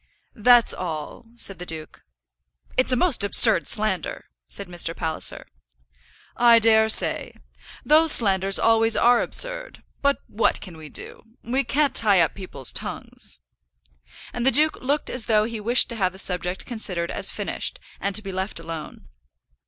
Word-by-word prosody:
"That's 240 Hz, 0 st, +4 dB
all," 160 Hz, +3 st, -7 dB
said 195 Hz, -6 st, 0 dB
the -, -, -6 dB
duke. 160 Hz, -1 st, -9 dB, 0.7 s
"It's 255 Hz, +1 st, +2 dB
a -, -, +2 dB
most 270 Hz, -, +1 dB
absurd 210 Hz, +2 st, +4 dB
slander," 210 Hz, -7 st, -1 dB, 0.2 s
said 200 Hz, -, -6 dB
Mr. 170 Hz, -1 st, -1 dB
Palliser. 160 Hz, -1 st, -3 dB, 0.9 s
"I 235 Hz, -1 st, +5 dB
dare 220 Hz, -1 st, +3 dB
say. -, -, +3 dB, 0.5 s
Those 315 Hz, +1 st, +4 dB
slanders 195 Hz, -3 st, +4 dB
always 225 Hz, 0 st, +2 dB
are 240 Hz, 0 st, +3 dB
absurd; -, -, -2 dB, 0.2 s
but 280 Hz, 0 st, +1 dB
what 220 Hz, -, -1 dB
can 180 Hz, -4 st, -11 dB
we 155 Hz, -1 st, -12 dB
do? -, -, -9 dB, 0.2 s
We 260 Hz, +4 st, -1 dB
can't 285 Hz, +3 st, 0 dB
tie 205 Hz, -4 st, +3 dB
up 165 Hz, -, 0 dB
people's 185 Hz, -10 st, -5 dB
tongues." 65 Hz, -2 st, -6 dB, 0.9 s
And 240 Hz, -, -4 dB
the 265 Hz, -, +5 dB
duke 305 Hz, +3 st, 0 dB
looked 285 Hz, +3 st, -2 dB
as 250 Hz, -3 st, -1 dB
though 215 Hz, -2 st, +2 dB
he 225 Hz, 0 st, -5 dB
wished 235 Hz, +4 st, +2 dB
to 235 Hz, -, -6 dB
have 185 Hz, -3 st, -1 dB
the -, -, -13 dB
subject 180 Hz, -1 st, +1 dB
considered 185 Hz, -8 st, -3 dB
as -, -, +2 dB
finished, -, -, -4 dB, 0.2 s
and 200 Hz, 0 st, -3 dB
to 215 Hz, -, 0 dB
be 195 Hz, -, -7 dB
left 190 Hz, 0 st, -3 dB
alone. 165 Hz, -, -9 dB
215 Hz, 160 wpm, -22 LUFS, 180-245 Hz, 0.9 s, I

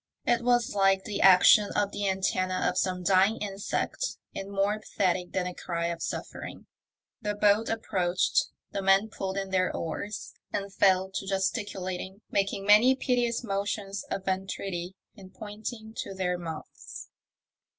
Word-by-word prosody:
It 240 Hz, -1 st, +2 dB
was 240 Hz, -1 st, +2 dB
like 195 Hz, -1 st, +3 dB
the 210 Hz, -, -3 dB
action 195 Hz, +2 st, +7 dB
of 205 Hz, -1 st, +1 dB
the 205 Hz, -1 st, -1 dB
antennae 185 Hz, -1 st, 0 dB
of 180 Hz, -, 0 dB
some 185 Hz, -1 st, -1 dB
dying 195 Hz, +4 st, +4 dB
insect, 205 Hz, -, -3 dB, 0.2 s
and 195 Hz, -, -6 dB
more 200 Hz, +2 st, 0 dB
pathetic 185 Hz, -4 st, -1 dB
than 185 Hz, -1 st, -1 dB
a 180 Hz, -, -4 dB
cry 170 Hz, -1 st, -3 dB
of 170 Hz, -1 st, -5 dB
suffering. -, -, -6 dB, 0.6 s
The 210 Hz, -1 st, -2 dB
boat 210 Hz, +2 st, +3 dB
approached, 190 Hz, -5 st, +1 dB, 0.2 s
the 200 Hz, -, -2 dB
men 195 Hz, +3 st, +4 dB
pulled 195 Hz, -2 st, -4 dB
in 195 Hz, -1 st, -3 dB
their 185 Hz, -1 st, +2 dB
oars, 195 Hz, +6 st, -5 dB, 0.2 s
and 200 Hz, -1 st, -3 dB
fell 190 Hz, -1 st, +3 dB
to 195 Hz, -, -4 dB
gesticulating, 190 Hz, -1 st, -2 dB
making 195 Hz, 0 st, 0 dB
many 215 Hz, +6 st, +6 dB
piteous 245 Hz, -2 st, 0 dB
motions 200 Hz, -1 st, -3 dB
of 195 Hz, -, -4 dB
entreaty, 190 Hz, -1 st, -3 dB, 0.2 s
and 190 Hz, -2 st, -13 dB
pointing 220 Hz, +1 st, -7 dB
to 195 Hz, -, -5 dB
their 180 Hz, -1 st, 0 dB
mouths. 165 Hz, -3 st, -8 dB
195 Hz, 150 wpm, -28 LUFS, 185-210 Hz, 0.6 s, action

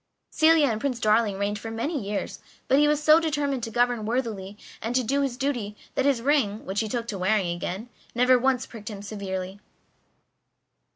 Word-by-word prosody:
Celia 315 Hz, -1 st, +5 dB
and 220 Hz, -5 st, -1 dB
Prince 260 Hz, -4 st, -1 dB
Darling 215 Hz, -2 st, +2 dB
reigned 205 Hz, +1 st, -1 dB
for 225 Hz, -, -6 dB
many 270 Hz, +7 st, -2 dB
years, 200 Hz, 0 st, -4 dB, 0.3 s
but 270 Hz, -, +4 dB
he 295 Hz, -, +5 dB
was 300 Hz, 0 st, +1 dB
so 310 Hz, +1 st, +7 dB
determined 290 Hz, -5 st, -1 dB
to 225 Hz, -, -4 dB
govern 240 Hz, 0 st, +1 dB
worthily 215 Hz, -4 st, -3 dB, 0.2 s
and 230 Hz, +2 st, -3 dB
to 255 Hz, -, +3 dB
do 275 Hz, +5 st, +1 dB
his 265 Hz, -3 st, -1 dB
duty 245 Hz, -7 st, -2 dB, 0.2 s
that 270 Hz, -, 0 dB
his 270 Hz, -5 st, +2 dB
ring, 250 Hz, -7 st, +1 dB
which 195 Hz, +2 st, -2 dB
he 220 Hz, -, -1 dB
took 235 Hz, +1 st, -3 dB
to 200 Hz, -, -4 dB
wearing 185 Hz, -2 st, +1 dB
again, 185 Hz, +6 st, -5 dB, 0.3 s
never 250 Hz, +1 st, +5 dB
once 260 Hz, 0 st, +1 dB
pricked 220 Hz, -2 st, -9 dB
him 200 Hz, -2 st, -8 dB
severely. 195 Hz, -2 st, -5 dB
230 Hz, 190 wpm, -26 LUFS, 205-270 Hz, 0.3 s, so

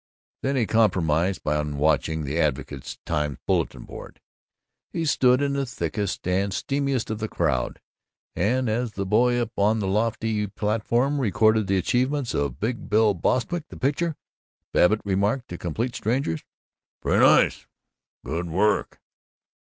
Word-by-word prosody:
Then 135 Hz, +1 st, 0 dB
he 125 Hz, -4 st, +2 dB
compromised 95 Hz, -6 st, +1 dB
on 75 Hz, -1 st, 0 dB
watching 80 Hz, +1 st, +1 dB
the 75 Hz, +4 st, -2 dB
Advocate 70 Hz, -3 st, -2 dB
Times 75 Hz, -4 st, -1 dB
bulletin -, -, 0 dB
board. -, -, -11 dB, 0.7 s
He 165 Hz, -, -2 dB
stood 130 Hz, -2 st, +3 dB
in 140 Hz, -1 st, 0 dB
the 140 Hz, 0 st, 0 dB
thickest 95 Hz, -1 st, -3 dB
and 95 Hz, +2 st, +1 dB
steamiest 135 Hz, +3 st, -1 dB
of 110 Hz, -, -3 dB
the 110 Hz, -, -2 dB
crowd, 70 Hz, -, -1 dB, 0.6 s
and 125 Hz, +7 st, +1 dB
as 115 Hz, +1 st, -1 dB
the 100 Hz, -, -3 dB
boy 120 Hz, +5 st, +3 dB
up 120 Hz, -1 st, -2 dB
on 105 Hz, +3 st, +3 dB
the 105 Hz, -, -2 dB
lofty 110 Hz, +1 st, 0 dB
platform 115 Hz, +7 st, 0 dB
recorded 110 Hz, -2 st, +3 dB
the 95 Hz, -1 st, +2 dB
achievements 125 Hz, -, 0 dB
of 70 Hz, -2 st, -2 dB
Big 115 Hz, +3 st, -3 dB
Bill 105 Hz, -1 st, +4 dB
Bostwick, 160 Hz, -, -1 dB
the -, -, -11 dB
pitcher, 150 Hz, +4 st, 0 dB, 0.6 s
Babbitt 105 Hz, +5 st, +4 dB
remarked 100 Hz, +6 st, 0 dB
to 90 Hz, -, -6 dB
complete 115 Hz, +9 st, -2 dB
strangers, 115 Hz, -, -1 dB, 0.6 s
"Pretty -, -, +1 dB
nice! -, -, +4 dB, 0.6 s
Good 85 Hz, +6 st, -3 dB
work!" 100 Hz, +6 st, +1 dB
105 Hz, 145 wpm, -25 LUFS, 85-125 Hz, 0.7 s, Bill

